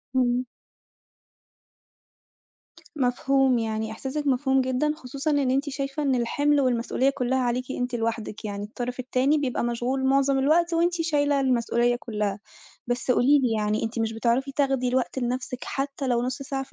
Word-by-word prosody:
إمم. 250 0 +2 2.5
مفهوم، 265 0 +2
يعني 220 -1 -2
إحساسِك 275 +6 -4
مفهوم 265 0 +2
جدًا 260 +4 0
خصوصًا 275 +2 -3
إن 280 -3 +2
أنتِ 275 +2 0
شايفة 275 +1 -3
إن 270 -2 +2
الحِمل 285 +5 +2
والمسئولية 255 +1 +1
كلّها 260 -1 0
عليكِ 250 +1 -1
أنتِ 245 0 -2
لوحدِك، 225 -1 -3
يعني 205 0 -4
الطرف 245 +4 -5
التاني 260 +4 +1
بيبقى 260 -4 -1
مشغول 245 +3 -1
معظم 275 0 +3
الوقت، 335 +5 +3
وأنتِ 340 +1 +2
شايلة 290 -3 +1
المسئولية 240 -2 +2
كلّها. 210 -4 -3 0.5
بس 245 +1 -1
قولي 280 +4 +5
لي 250 -4 +1
يعني 210 +1 0
أنتِ 225 +1 -4
مش 225 0 0
بتعرفي 240 +4 0
تاخدي 270 -3 +1
الوقت 255 +1 0
لنفسِك 250 0 -3
حتى 275 0 -3
لو 240 -1 +1
نُص 250 +2 -3
ساعة 270 -1 -3
في 270 - -13
255 Hz, 155 wpm, -25 LUFS, 240-275 Hz, 2.5 s, قولي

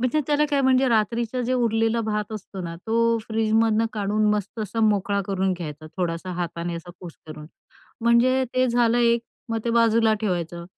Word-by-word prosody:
म्हणजे 255 +5 +1
त्याला 295 0 +2
काय 280 -1 +2
म्हणजे 260 0 +3
रात्रीचं 235 +2 0
जे 250 - -1
उरलेलं 225 -2 +1
भात 210 0 -2
असतो 195 -2 -7
ना 170 0 -6
तो 230 +1 +2
फ्रीजमधुन 225 0 +2
काढून 210 0 0
मस्त 205 +3 -5
असा 215 +3 -3
मोकळा 205 -2 +2
करून 190 -1 0
घ्यायचा, 155 -3 -8
थोडासा 175 0 -3
हाताने 170 0 -4
असा 175 +1 -9
कुस्करून. 155 -3 -11 0.6
म्हणजे 245 +3 +3
ते 255 0 +3
झालं 240 0 +2
एक, 235 -1 +3 0.3
मग 225 - 0
ते 235 - 0
बाजूला 230 -1 +3
ठेवायचं. 175 -4 -3
220 Hz, 165 wpm, -24 LUFS, 190-235 Hz, 0.6 s, म्हणजे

